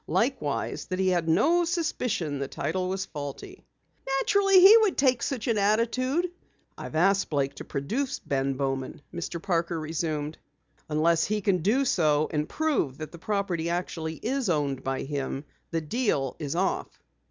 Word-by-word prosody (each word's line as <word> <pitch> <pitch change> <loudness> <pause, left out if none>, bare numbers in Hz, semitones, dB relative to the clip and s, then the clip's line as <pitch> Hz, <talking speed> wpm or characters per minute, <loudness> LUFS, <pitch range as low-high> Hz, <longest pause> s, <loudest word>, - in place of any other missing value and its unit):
Likewise, - - -1
that 185 - -2
he 190 0 +2
had 175 -3 +1
no 335 - +4
suspicion 250 - -1
the 140 - -2
title 185 +6 -2
was 190 0 -2
faulty." 145 - -8 0.5
"Naturally 390 +5 +4
he 390 +4 +10
would 430 -5 +2
take 260 -3 +3
such 250 -5 -2
an 225 -3 +2
attitude." 250 - +1 0.5
"I've - - -8
asked 195 +4 +3
Blake 140 -2 0
to - - -6
produce 230 - -2
Ben 135 -1 -1
Bowman," 135 0 -3
Mr. 170 0 -4
Parker 170 -1 -1
resumed. 155 -1 -3 0.5
"Unless 160 +2 +3
he 215 +1 0
can 195 -2 +1
do 225 - +2
so 155 - +2
and 150 0 -1
prove 290 - 0
that 155 -1 -7
the 170 - -11
property 185 -4 -1
actually 165 -2 -3
is 250 - -2
owned 145 -5 0
by 135 0 -2
him, 140 0 -3 0.2
the 165 -1 -1
deal 155 - -1
is 150 0 -3
off." 190 +2 0
170 Hz, 160 wpm, -27 LUFS, 150-235 Hz, 0.5 s, he